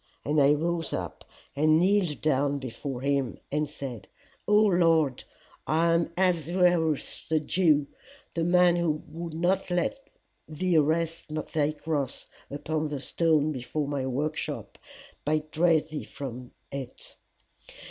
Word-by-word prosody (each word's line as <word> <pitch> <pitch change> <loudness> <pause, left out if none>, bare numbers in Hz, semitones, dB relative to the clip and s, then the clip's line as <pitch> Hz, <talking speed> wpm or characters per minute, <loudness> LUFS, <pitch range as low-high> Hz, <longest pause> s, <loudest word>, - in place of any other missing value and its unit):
And 150 +1 +2
I 140 +1 +6
rose 165 +2 -1
up, - - -5 0.3
and 155 +2 +4
kneeled 185 -4 +2
down 145 -1 +1
before 130 0 -6
him, 140 -2 0
and 150 0 0
said, 135 -7 -7 0.4
O 210 - +4
Lord, 165 -8 +3 0.4
I 165 +4 +3
am 170 0 +1
Ahasuerus 175 -3 +1
the 160 -1 +3
Jew, 155 -2 +2 0.5
the 165 - -1
man 175 0 +4
who 155 -3 0
would 165 +1 -7
not 180 +4 +1
let 180 +11 -1 0.4
thee 165 +2 +1
rest 160 +1 0 0.2
thy 150 -1 +1
cross 150 -4 -3 0.2
upon 155 +2 -2
the 145 -2 -4
stone 155 +1 +1
before 140 +2 -3
my 140 -2 -2
workshop, 145 +4 -3 0.4
but 155 +1 -1
drave 160 -1 +3
thee 155 - -4
from 125 -2 -7 0.2
it. 135 -2 -8
155 Hz, 130 wpm, -27 LUFS, 145-170 Hz, 0.5 s, I